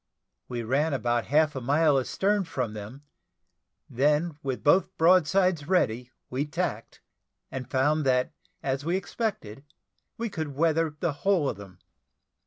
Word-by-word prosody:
We 120 -2 -4
ran 140 +6 +1
about 120 -1 0
half 150 +1 +2
a 130 - -3
mile 145 +2 +3
astern 195 +9 0
from 125 -8 -3
them; 110 +7 -9 0.8
then 150 +5 +1
with 135 -2 -4
both 180 +6 +3
broadsides 180 -1 +3
ready, 125 -9 +1 0.2
we 135 +4 -2
tacked, 145 - -4 0.5
and 130 -1 -6
found 150 +4 +2
that, 125 +4 +2 0.3
as 135 +1 -1
we 170 +4 0
expected, 190 - -4 0.5
we 230 - -2
could 160 -8 -5
weather 160 0 +1
the 170 -4 0
whole 190 -7 +2
of - - -3
them. 100 -3 -12
145 Hz, 140 wpm, -27 LUFS, 130-165 Hz, 0.8 s, mile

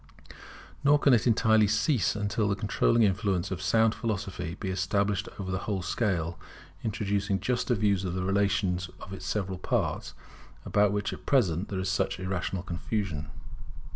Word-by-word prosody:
Nor 145 +1 +6
can 140 -2 +4
it 120 0 +3
entirely 110 -2 +4
cease 105 +3 +2
until 105 +1 0
the 100 - +1
controlling 105 +3 +2
influence 95 -3 +1
of 90 -1 -3
sound 110 +5 +3
philosophy 100 -8 -4
be 95 - -3
established 95 +1 0
over 95 -2 -4
the 95 - -1
whole 95 -3 -1
scale, 85 -5 -1 0.4
introducing 100 -2 -1
juster 125 0 0
views 100 -2 +1
of 90 -1 -3
the 95 - -1
relations 95 -2 +1
of 95 - -9
its 95 - -7
several 95 -3 -2
parts, - - -1 0.5
about 105 -1 +3
which 105 0 -1
at - - -11
present 95 - +2
there 100 - -3
is 95 0 -2
such 95 0 0
irrational 95 -1 -2
confusion. 85 -4 -3
100 Hz, 160 wpm, -28 LUFS, 95-105 Hz, 0.5 s, Nor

